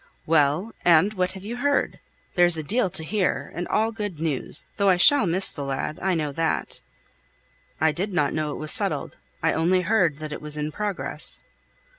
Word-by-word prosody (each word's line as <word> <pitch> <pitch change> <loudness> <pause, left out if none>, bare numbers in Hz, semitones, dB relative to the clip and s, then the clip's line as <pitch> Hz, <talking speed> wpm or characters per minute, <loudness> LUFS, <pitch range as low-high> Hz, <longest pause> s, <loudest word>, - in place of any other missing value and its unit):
"Well! 160 +7 +2
and 175 +4 +4
what 185 -2 -1
have 190 -1 -10
you 230 +4 -5
heard? 285 +3 0 0.3
There's 175 -2 +5
a 155 - -2
deal 205 - 0
to 160 - -2
hear, 195 +2 -1
and 175 +1 -4
all 220 +1 +1
good 205 -7 -5
news, 155 -5 0
though 200 -1 +3
I 185 - +4
shall 225 +3 +5
miss 185 +3 +2
the 145 - -6
lad, 135 +2 -4
I 190 -1 0
know 150 -3 -2
that." 160 +2 -2 1.0
"I 160 +1 +3
did 190 +6 -3
not 145 -6 0
know 155 -1 -2
it - - -5
was 155 0 0
settled; - - -1 0.3
I - - +2
only 180 +3 +2
heard 180 -5 +1
that 155 0 -7
it - - -6
was 150 0 -1
in 150 +1 -3
progress." 205 +2 -1
175 Hz, 195 wpm, -24 LUFS, 155-200 Hz, 1.0 s, There's